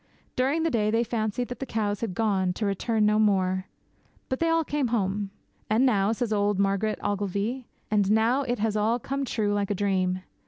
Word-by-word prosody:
During 275 +6 +1
the 330 - +1
day 215 -4 +1
they 225 +2 +2
fancied 230 +1 -2
that 245 - -6
the 270 - -3
cows 205 -3 -1
had 215 -6 -3
gone, 190 -4 +1
to 210 - -3
return 210 +2 +1
no 210 0 +3
more. 190 -3 +2 0.6
But 260 - -1
they 330 - +2
all 330 0 +3
came 290 -3 -1
home. 205 -3 -1 0.4
'And 225 +5 +3
now,' 205 -5 +3
says 225 -1 -1
old 205 -1 +1
Margaret 200 +2 +1
Ogilvy, 205 +5 -2 0.2
'and 205 -2 +2
now 225 +5 +3
it 245 -2 -1
has 215 0 0
all 215 +3 +2
come 275 +3 -3
true 210 -4 0
like 205 -1 0
a 205 - 0
dream. 185 -2 0
215 Hz, 200 wpm, -26 LUFS, 200-240 Hz, 0.6 s, no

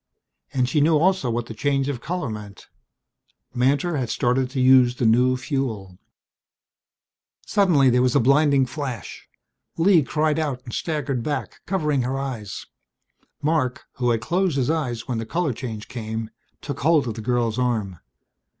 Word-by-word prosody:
And 130 -2 +1
she 145 +4 +1
knew 155 +1 +4
also 185 -4 +2
what 120 0 -2
the 115 - -8
change 135 +3 0
of 135 -4 -3
color 175 0 -3
meant. 105 -2 -9 0.9
Mantor 140 +7 +1
had 125 -4 -2
started 125 +1 +1
to 135 0 -4
use 130 -1 +5
the 125 - -1
new 125 +3 +4
fuel! 120 - -4 1.5
Suddenly 170 -11 +3
there 125 +1 +3
was 125 -1 +2
a - - +6
blinding 140 +2 +4
flash. 130 -5 -6 0.5
Lee 170 0 +5
cried 155 +2 0
out 140 -5 -2
and 120 - -8
staggered 145 -6 -2
back, 145 +4 -4
covering 150 -7 0
her 130 +2 -2
eyes. 125 -7 -5 0.8
Marc, 145 -5 0
who 125 -1 +1
had 115 -2 +1
closed 175 +4 0
his 130 +2 +1
eyes 125 -8 -2
when 120 -3 -2
the 115 - -4
color 165 -1 -1
change 110 -3 -6
came, 110 -1 -5 0.3
took 140 -2 -5
hold 155 -2 +3
of 115 - -2
the 110 - -7
girl's 120 0 0
arm. 110 -8 -1
130 Hz, 160 wpm, -23 LUFS, 120-150 Hz, 1.5 s, a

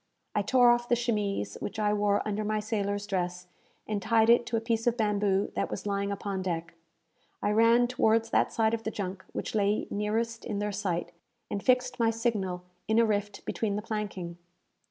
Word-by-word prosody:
I 210 - +2
tore 245 +3 +5
off 240 0 +1
the 240 - +5
chemise 210 - -1
which - - -5
I 210 -1 +2
wore 205 0 +1
under 210 0 -1
my 215 0 0
sailor's 205 -1 -2
dress, 180 -2 -2 0.4
and 210 -2 -2
tied 225 +2 +4
it 240 0 +4
to 230 - 0
a - - +2
piece 225 0 -1
of 240 0 +2
bamboo 205 -2 +1
that - - -1
was 190 - -5
lying 200 0 -1
upon 200 -1 -3
deck. 170 -3 -3 0.7
I 205 - 0
ran 230 +3 +5
towards 225 -2 +2
that - - +3
side 220 0 +2
of 230 - -1
the 220 - -3
junk 190 -3 -5
which - - -4
lay 205 0 +1
nearest 225 +3 -1
in 210 -4 -3
their 205 0 -1
sight, 190 -4 -2 0.4
and 200 - -2
fixed 255 +1 +2
my 230 -1 +4
signal 210 -6 -1 0.2
in 220 - +2
a 230 - +6
rift 205 -1 -2
between 210 -3 -1
the 210 - -3
planking! 200 -6 -4
210 Hz, 195 wpm, -29 LUFS, 200-230 Hz, 0.7 s, a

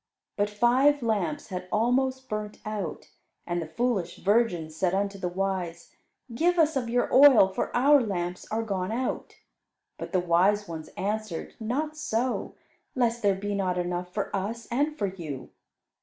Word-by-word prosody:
But 205 0 +1
five 250 +6 +3
lamps 200 -9 -1
had 180 -1 -5
almost 260 +4 +1
burnt 210 -1 -4
out, 205 -7 -5 0.3
and 175 0 -2
the 160 - -5
foolish 205 +2 -1
virgins 190 -7 +1
said 180 +2 +1
unto 200 0 -1
the 180 - -2
wise, 185 -2 -3 0.4
"Give 345 +8 +2
us 315 -2 +3
of 245 -3 -1
your 245 +1 0
oil, 260 -8 +8
for 190 - -2
our 280 +3 +6
lamps 180 -5 -3
are 225 +1 -1
gone 195 -3 -2
out." 250 +3 -3 0.6
But - - -6
the 185 - +2
wise 185 +4 +2
ones 160 -2 -6
answered, 210 -3 -3
"Not 280 +8 -2
so; 255 -4 -2 0.4
lest 240 -2 +1
there 200 -3 +3
be 205 +2 -3
not 185 -2 0
enough 180 0 -2
for 205 +1 -3
us 215 +4 -3
and 295 +5 0
for 205 - 0
you. 165 -9 -6
205 Hz, 160 wpm, -27 LUFS, 180-245 Hz, 0.6 s, oil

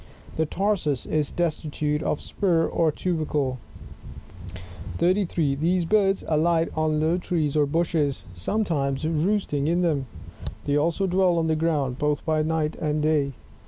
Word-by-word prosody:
The 160 -1 0
tarsus 180 -8 0
is 150 -2 0
destitute 150 -3 -1
of 150 - -1
spur 170 -5 +1
or 165 -2 +1
tubercle. 150 -6 -1 1.4
33. 170 -5 +1
These 170 +5 +1
birds 195 0 +2
alight 165 +1 +2
on 155 -1 +1
low 160 +3 +1
trees 155 -5 -1
or 150 -1 +3
bushes, 160 -2 0
sometimes 140 - -1
roost 165 +5 0
ing 145 0 0
in 175 +2 +2
them; 145 -6 0 0.6
they 145 - +1
also 165 +6 +1
dwell 185 -1 +2
on 165 - +1
the 160 -1 +1
ground, 150 -5 0
both 150 -1 0
by 155 -1 +1
night 155 0 0
and 150 -1 -1
day. 150 -3 +1
155 Hz, 145 wpm, -25 LUFS, 150-175 Hz, 1.4 s, or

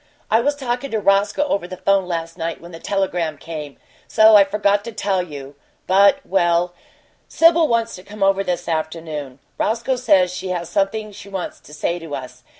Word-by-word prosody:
I 220 - +5
was 290 +4 +1
talkin' 260 0 -3
to 220 - -1
Roscoe 200 +6 +2
over 200 -11 -1
the 185 - -8
'phone 195 -1 +2
last 165 -1 -4
night 165 -1 -4
when 170 +1 -12
the 165 - -9
telegram 180 -6 -1
came, 150 -4 -8 0.3
so 220 0 +6
I 205 - +9
forgot 205 0 +1
to 230 - -5
tell 200 -3 0
you, 145 -5 -8 0.3
but 200 +9 +4
well, 175 -1 +1 0.5
Sibyl 330 0 +4
wants 230 -2 0
to 180 - -12
come 210 0 -5
over 195 0 +3
this 175 -2 -3
afternoon. 155 -4 -4 0.2
Roscoe 235 +4 0
says 185 -7 +3
she 185 +1 -5
has 175 -2 -3
something 210 +3 -1
she 200 0 -12
wants 190 -2 -5
to - - -17
say 170 +3 -2
to 165 -3 -6
us. 130 -1 -9
195 Hz, 190 wpm, -20 LUFS, 170-215 Hz, 0.5 s, I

